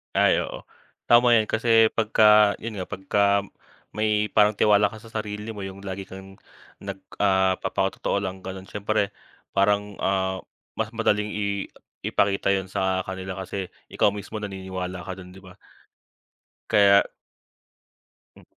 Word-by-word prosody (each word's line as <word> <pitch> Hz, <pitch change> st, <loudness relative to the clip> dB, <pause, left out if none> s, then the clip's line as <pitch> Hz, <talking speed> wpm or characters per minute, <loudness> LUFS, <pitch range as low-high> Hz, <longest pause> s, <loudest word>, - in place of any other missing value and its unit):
Ay, -, -, +4 dB
oo. -, -, -8 dB, 0.5 s
Tama 120 Hz, 0 st, +6 dB
yan, 110 Hz, -2 st, +3 dB
kasi 115 Hz, 0 st, +4 dB
pagka, 105 Hz, -1 st, +5 dB
yun 110 Hz, -3 st, -6 dB
nga, 90 Hz, -, -4 dB
pagka 100 Hz, 0 st, +1 dB, 0.6 s
may 105 Hz, -1 st, +1 dB
parang 105 Hz, 0 st, +4 dB
tiwala 105 Hz, 0 st, +4 dB
ka 110 Hz, -, -11 dB
sa 115 Hz, -, -14 dB
sarili 105 Hz, 0 st, -5 dB
mo, 100 Hz, -3 st, -6 dB
yung 95 Hz, 0 st, -9 dB
lagi 95 Hz, 0 st, -6 dB
kang 95 Hz, 0 st, -12 dB, 0.4 s
nag, 100 Hz, -1 st, -7 dB, 0.2 s
ah, 95 Hz, -2 st, +3 dB
papakatotoo 100 Hz, -, -1 dB
lang 95 Hz, -1 st, -6 dB
ganun, 95 Hz, +1 st, -7 dB
siyempre 105 Hz, 0 st, -1 dB, 0.5 s
parang, 100 Hz, 0 st, +1 dB
ah, 95 Hz, -1 st, 0 dB, 0.4 s
mas 110 Hz, +1 st, -2 dB
madaling 105 Hz, -2 st, 0 dB
i 100 Hz, -1 st, -2 dB, 0.4 s
ipakita 100 Hz, 0 st, +1 dB
yun 95 Hz, -1 st, -2 dB
sa 95 Hz, -1 st, 0 dB
kanila, 95 Hz, 0 st, -5 dB
kasi 95 Hz, 0 st, -6 dB, 0.2 s
ikaw 100 Hz, -, +2 dB
mismo 105 Hz, +2 st, -7 dB
naniniwala 95 Hz, -3 st, -5 dB
ka 95 Hz, +2 st, -7 dB
dun, 90 Hz, -1 st, -11 dB
'di 95 Hz, -, -14 dB
ba? 95 Hz, 0 st, -15 dB, 1.1 s
Kaya, 100 Hz, -1 st, +6 dB, 1.3 s
Hmm. -, -, -17 dB
100 Hz, 140 wpm, -24 LUFS, 95-105 Hz, 1.3 s, Tama